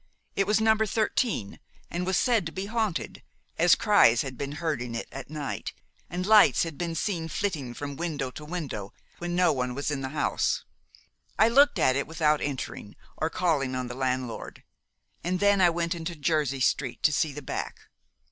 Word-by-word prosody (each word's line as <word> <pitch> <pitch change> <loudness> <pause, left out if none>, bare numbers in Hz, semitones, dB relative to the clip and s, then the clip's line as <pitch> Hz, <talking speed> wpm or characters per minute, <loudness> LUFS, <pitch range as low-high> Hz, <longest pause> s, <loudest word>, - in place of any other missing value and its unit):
It 195 - +1
was 210 +1 +3
No. 220 0 +4
13, 215 - -1 0.3
and 180 +1 -2
was 190 - +2
said 230 -8 +2
to - - -6
be 190 +4 -4
haunted, 220 -4 -2 0.4
as 170 +1 +6
cries 205 - +5
had 135 -2 -6
been 140 +3 -4
heard 155 -4 -2
in 120 -1 -5
it 115 - -4
at 135 +1 -8
night, 150 -2 -4 0.4
and 180 +1 -3
lights 215 0 +6
had 165 -3 -5
been 170 +1 -3
seen 165 -2 -2
flitting 155 -10 -3
from 145 -1 -5
window 150 -6 -3
to 150 - -9
window 150 - -5 0.3
when 175 0 -3
no 180 -2 +4
one 125 -2 -2
was 140 +2 -2
in 140 -2 -2
the 130 - -3
house. 155 - 0 0.7
I 220 - +5
looked 285 +4 +5
at 130 - +3
it 140 - -1
without 155 -2 +1
entering, 130 -7 -5 0.2
or 160 - -1
calling 150 -8 0
on 125 -1 -3
the - - -5
landlord, 130 -2 -3 0.6
and 180 +1 -1
then 200 -1 +4
I 175 - +7
went 170 +1 -1
into 170 0 -5
Jersey 150 -3 0
Street 130 0 0
to 155 - +4
see 155 +1 +1
the 145 +1 -8
back. - - -5
160 Hz, 190 wpm, -27 LUFS, 135-180 Hz, 0.7 s, I